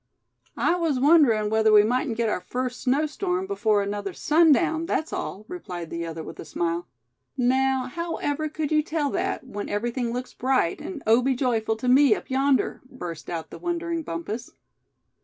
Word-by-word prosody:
"I - - +2
was 320 -7 0
wondering 255 -8 +4
whether 220 0 +4
we 210 -1 +8
mightn't 245 +1 0
get 230 -1 +1
our 210 - -1
first 250 +5 -4
snow 275 +5 +2
storm 360 +4 -2
before 220 - +1
another 200 -1 -4
sundown, 320 - +3
that's 320 - -1
all," 210 +3 -4
replied 180 - -7
the 170 0 -3
other, 165 -1 -6
with - - -10
a - - -5
smile. 170 +1 -2 0.5
"Now, 260 +1 +2
however 310 0 -3
could 305 0 -3
you 305 0 +4
tell 300 -2 -1
that, - - -2
when 205 -5 -6
everything 235 +3 -1
looks 250 +1 -5
bright, 255 -9 0
and 325 -7 -7
oh 225 +3 +5
be 265 +1 +1
joyful 230 -4 0
to 225 +3 -5
me 260 -2 +6
up - - -9
yonder?" 270 0 +1
burst 175 -11 -7
out 165 -2 -5
the - - -9
wondering 340 -1 -2
Bumpus. 215 - -5
255 Hz, 175 wpm, -25 LUFS, 215-305 Hz, 0.5 s, we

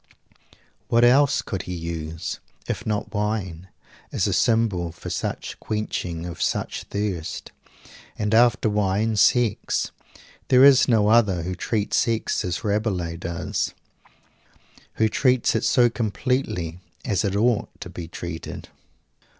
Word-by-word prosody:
What 115 +1 +3
else 140 +3 +5
could 95 -5 -4
he 90 - -3
use, 80 -1 -5 0.3
if - - -4
not 105 +1 -2
wine, 100 -5 -2 0.4
as - - 0
a - - 0
symbol 105 -7 +1
for 85 - -8
such - - -4
quenching 90 -6 -3
of 85 -2 -7
such - - -1
thirst. 95 -6 -4 0.7
And 105 0 -1
after 120 0 +4
wine, 105 +1 +1
sex. 115 0 +2 0.6
There 130 0 +6
is 140 -2 +7
no 110 -4 +3
other 105 -7 +4
who 90 +2 -3
treats 105 +3 -1
sex 115 -1 0
as 90 -1 -3
Rabelais 100 -6 -1
does; 85 0 -3 1.2
who 110 - +3
treats 125 +2 +2
it 110 - 0
so 120 -2 +4
completely 110 - -2 0.3
as 100 -6 0
it 100 -1 -1
ought 115 +1 +2
to - - -6
be 85 -2 -7
treated! 85 -1 -7
105 Hz, 130 wpm, -24 LUFS, 90-115 Hz, 1.2 s, is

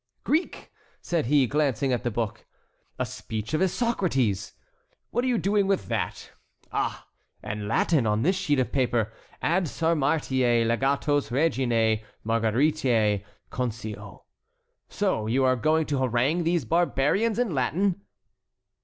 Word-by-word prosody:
"Greek!" 320 +5 -1 0.3
said 170 -8 -1
he, 140 0 +4
glancing 140 -1 0
at 120 - -1
the 120 - 0
book. 110 -2 -4 0.5
"A - - -1
speech 110 +3 -6
of 155 - +1
Isocrates! 175 - 0 0.6
What 245 - 0
are - - 0
you 245 -2 +2
doing 200 -1 +1
with 195 -1 0
that? - - -3 0.4
Ah! - - -2 0.4
and 105 -1 -4
Latin 125 +3 +2
on 105 +1 +1
this 185 +6 +2
sheet 180 -7 0
of 130 - 0
paper! 120 -5 0 0.3
Ad 175 +3 +2
Sarmatiæ 135 -7 +1
legatos 135 +4 +1
reginæ 120 -6 +1 0.2
Margaritæ 115 -2 +2 0.3
concio! 110 -5 -5 0.7
So 110 -1 -1
you 130 +4 +2
are 130 0 +4
going 155 +6 +2
to 145 -2 -1
harangue 130 +7 +1
these 170 -5 +1
barbarians 175 - +1
in 240 -7 0
Latin?" 175 +9 0
135 Hz, 130 wpm, -26 LUFS, 115-165 Hz, 0.7 s, he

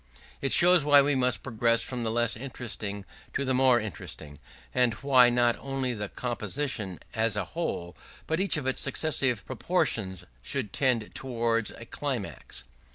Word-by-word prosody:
It 135 - -1
shows 175 -2 +6
why 145 -1 +7
we 145 +1 +2
must 125 -2 +1
progress 115 -1 +2
from 125 -2 -5
the 115 - -1
less 120 +1 +1
interesting 110 -5 -5 0.3
to 140 - -1
the 130 - +1
more 130 -1 +5
interesting; 80 -8 -8 0.3
and 120 -3 +2
why 130 0 +5
not 120 -1 +2
only 135 -2 -2
the 105 -3 -4
composition 120 - -2
as 110 -1 +1
a 100 - -1
whole, 85 - -3 0.3
but 160 +2 -1
each 190 -3 +1
of 145 - -4
its 130 - 0
successive 135 -5 +1
portions, 110 - -1 0.2
should - - -3
tend 125 -5 +1
towards 115 -3 -1
a 115 - -10
climax. 110 - -5
120 Hz, 160 wpm, -28 LUFS, 110-135 Hz, 0.3 s, why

